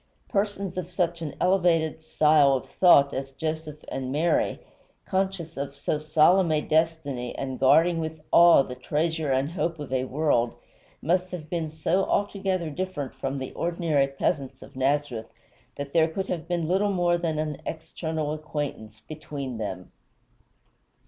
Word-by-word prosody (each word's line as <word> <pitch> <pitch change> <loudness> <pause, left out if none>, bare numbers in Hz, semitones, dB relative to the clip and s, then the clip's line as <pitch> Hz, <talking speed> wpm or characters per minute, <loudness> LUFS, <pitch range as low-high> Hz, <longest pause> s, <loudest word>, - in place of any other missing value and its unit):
Persons 200 -2 -1
of 180 -1 -6
such 175 -2 -1
an 155 -3 -5
elevated 170 -4 +2
style 150 -3 +4
of 130 - -2
thought 140 -6 +5
as 135 0 -3
Joseph 155 +1 -5
and 130 -1 -4
Mary, 160 +5 +1 0.5
conscious 190 -4 -2
of 140 0 -4
so 150 +2 -2
solemn 160 +4 +4
a 155 - +3
destiny 155 -6 -1
and 130 -1 -4
guarding 165 +6 +4
with 160 -1 -4
awe 170 -4 +7
the 125 - -7
treasure 155 +3 -1
and 135 +3 +1
hope 170 -1 -2
of 145 -3 -6
a 130 0 +1
world, 130 -4 +1 0.5
must 180 +3 +1
have 160 -4 -7
been 165 -3 -2
so 165 +5 0
altogether 190 -5 -1
different 155 -5 -4
from 135 +1 -4
the 130 -1 -5
ordinary 165 -5 +1
peasants 135 -1 -2
of - - -15
Nazareth 130 -4 -1 0.4
that 140 0 -6
there 160 -1 +4
could 190 +4 -4
have 165 -2 -3
been 170 -2 -1
little 195 +4 +2
more 175 -2 +2
than 165 -3 -1
an 155 -1 -3
external 160 -1 -3
acquaintance 145 -8 -5
between 140 -5 -6
them. 95 -4 -5
155 Hz, 155 wpm, -26 LUFS, 140-170 Hz, 0.5 s, awe